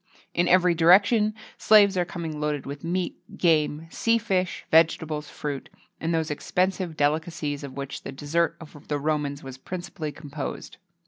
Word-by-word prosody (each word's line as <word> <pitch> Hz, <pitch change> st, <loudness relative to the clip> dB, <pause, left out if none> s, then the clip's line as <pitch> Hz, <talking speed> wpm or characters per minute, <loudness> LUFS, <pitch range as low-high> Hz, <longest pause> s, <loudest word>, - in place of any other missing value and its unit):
In 175 Hz, 0 st, +2 dB
every 180 Hz, -1 st, +5 dB
direction, 200 Hz, +6 st, +5 dB, 0.2 s
slaves 205 Hz, -2 st, +6 dB
are 180 Hz, -1 st, +1 dB
coming 165 Hz, -3 st, -5 dB
loaded 150 Hz, -2 st, -1 dB
with 140 Hz, +1 st, -7 dB
meat, 175 Hz, +2 st, -2 dB, 0.2 s
game, 155 Hz, -3 st, +2 dB
sea 230 Hz, 0 st, +2 dB
fish, 190 Hz, -5 st, -1 dB
vegetables, 160 Hz, -2 st, +2 dB
fruit, 145 Hz, -2 st, -5 dB, 0.3 s
and 165 Hz, -, -2 dB
those 160 Hz, -1 st, 0 dB
expensive 180 Hz, +2 st, -1 dB
delicacies 150 Hz, -1 st, -1 dB
of 140 Hz, -2 st, -7 dB
which 140 Hz, 0 st, -5 dB
the -, -, -7 dB
dessert 150 Hz, +5 st, 0 dB
of 155 Hz, -3 st, -13 dB
the 145 Hz, -, -1 dB
Romans 145 Hz, -1 st, -2 dB
was 135 Hz, -1 st, -9 dB
principally 175 Hz, -1 st, -5 dB
composed. 145 Hz, -1 st, -7 dB
160 Hz, 150 wpm, -26 LUFS, 145-180 Hz, 0.3 s, slaves